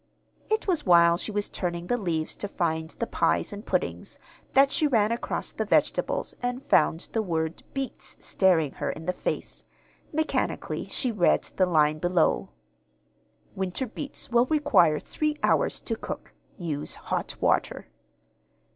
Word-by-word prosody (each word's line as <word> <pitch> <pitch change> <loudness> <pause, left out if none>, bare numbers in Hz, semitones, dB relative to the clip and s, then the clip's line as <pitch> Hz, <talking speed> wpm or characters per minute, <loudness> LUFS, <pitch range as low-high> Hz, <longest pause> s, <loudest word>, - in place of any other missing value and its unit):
It 435 +1 +1
was 345 -6 +1
while 170 -2 +6
she 190 - -3
was 205 0 0
turning 175 -1 -3
the 245 - +1
leaves 170 -8 -2
to 205 - -4
find 160 -4 -1
the 235 - -4
pies - - 0
and 205 +1 -7
puddings - - -2 0.4
that 275 +1 +5
she 305 - +2
ran 225 -5 +2
across 235 - -3
the - - -1
vegetables - - +1
and 245 +2 -2
found 160 +2 +3
the 225 - +1
word 165 -4 -2
"beets" 270 -1 -5
staring 170 -7 +2
her - - 0
in 160 - -6
the 180 - 0
face. - - -4 0.5
Mechanically 315 +1 -1
she 255 - +1
read 195 -6 +3
the 185 - +3
line 155 -3 +3
below. 175 0 +1 1.0
"Winter 190 +7 -1
beets 275 +2 -7
will 240 +1 +4
require 280 - +4
three 305 -1 -2
hours - - +2
to - - -2
cook. - - -7 0.2
Use 155 -5 -3
hot - - -3
water." - - +1
190 Hz, 150 wpm, -27 LUFS, 170-250 Hz, 1.0 s, while